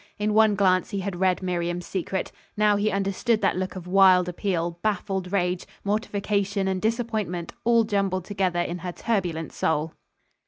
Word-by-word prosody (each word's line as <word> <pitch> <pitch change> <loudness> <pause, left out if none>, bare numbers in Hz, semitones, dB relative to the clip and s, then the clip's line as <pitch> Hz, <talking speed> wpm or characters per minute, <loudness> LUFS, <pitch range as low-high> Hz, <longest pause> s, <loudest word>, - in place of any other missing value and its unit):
In 210 0 0
one 215 -1 +5
glance 185 -2 +2
he 200 - -3
had 185 -2 -4
read 185 0 +2
Miriam's 175 -1 -2
secret. 190 0 -3 0.3
Now 210 -1 +4
he 205 +1 +1
understood 200 +3 0
that 195 - +2
look 185 +1 -3
of 185 -2 -7
wild 185 -1 +5
appeal, 175 -2 -2
baffled 195 -3 -2
rage, 180 -2 0 0.2
mortification 200 -1 -1
and 190 -1 -1
disappointment, 220 -6 -2
all 235 -1 +5
jumbled 195 -4 -1
together 190 -4 0
in 175 +1 -3
her 180 0 -5
turbulent 175 -9 -2
soul. 160 0 0
190 Hz, 160 wpm, -25 LUFS, 180-205 Hz, 0.3 s, one